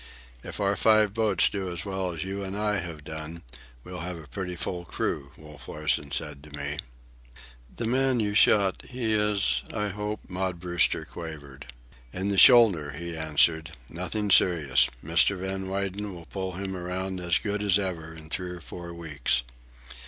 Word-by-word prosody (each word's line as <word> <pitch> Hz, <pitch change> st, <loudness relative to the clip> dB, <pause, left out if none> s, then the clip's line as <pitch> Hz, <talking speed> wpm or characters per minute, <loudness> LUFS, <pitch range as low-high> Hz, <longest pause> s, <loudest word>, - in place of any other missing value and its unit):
"If -, -, -7 dB
our 100 Hz, 0 st, +2 dB
five 110 Hz, +1 st, +4 dB
boats 110 Hz, -4 st, +3 dB
do 95 Hz, -2 st, -3 dB
as 85 Hz, +1 st, -5 dB
well 95 Hz, -2 st, -2 dB
as 80 Hz, -2 st, -4 dB
you 100 Hz, +1 st, -4 dB
and 95 Hz, +1 st, -4 dB
I 105 Hz, 0 st, +1 dB
have 80 Hz, -3 st, -7 dB
done, 80 Hz, +2 st, -7 dB, 0.4 s
we'll 90 Hz, 0 st, -8 dB
have 90 Hz, +2 st, -4 dB
a 80 Hz, -, -11 dB
pretty 90 Hz, +3 st, -5 dB
full 90 Hz, 0 st, -4 dB
crew," 70 Hz, -4 st, -3 dB
Wolf 75 Hz, -4 st, -13 dB
Larsen 75 Hz, -1 st, 0 dB
said 75 Hz, -1 st, -2 dB
to 75 Hz, -1 st, -10 dB
me. 75 Hz, +1 st, -3 dB, 1.0 s
"The 120 Hz, -, -3 dB
man 130 Hz, +1 st, +2 dB
you 105 Hz, -2 st, 0 dB
shot—he 110 Hz, +3 st, +2 dB
is—I 105 Hz, -, +1 dB
hope?" 105 Hz, +2 st, -4 dB
Maud 90 Hz, -1 st, -3 dB
Brewster 90 Hz, 0 st, +2 dB
quavered. 70 Hz, -5 st, -9 dB, 0.4 s
"In 95 Hz, +5 st, -2 dB
the 100 Hz, -1 st, +2 dB
shoulder," 100 Hz, -, +7 dB
he 85 Hz, +2 st, -5 dB
answered. 80 Hz, +1 st, +2 dB, 0.2 s
"Nothing 95 Hz, +4 st, -2 dB
serious, 80 Hz, -10 st, +5 dB, 0.2 s
Mr. 85 Hz, +4 st, +4 dB
Van 95 Hz, +1 st, -3 dB
Weyden 100 Hz, 0 st, -3 dB
will 85 Hz, -1 st, -11 dB
pull 95 Hz, 0 st, -4 dB
him 95 Hz, +1 st, -4 dB
around 95 Hz, +1 st, -3 dB
as 85 Hz, -1 st, +2 dB
good 105 Hz, -1 st, -2 dB
as 100 Hz, -2 st, +4 dB
ever 85 Hz, -5 st, -3 dB
in 80 Hz, -1 st, -12 dB
three 90 Hz, 0 st, -3 dB
or 90 Hz, 0 st, -7 dB
four 85 Hz, 0 st, -8 dB
weeks." 75 Hz, -7 st, 0 dB
90 Hz, 165 wpm, -27 LUFS, 80-100 Hz, 1.0 s, shoulder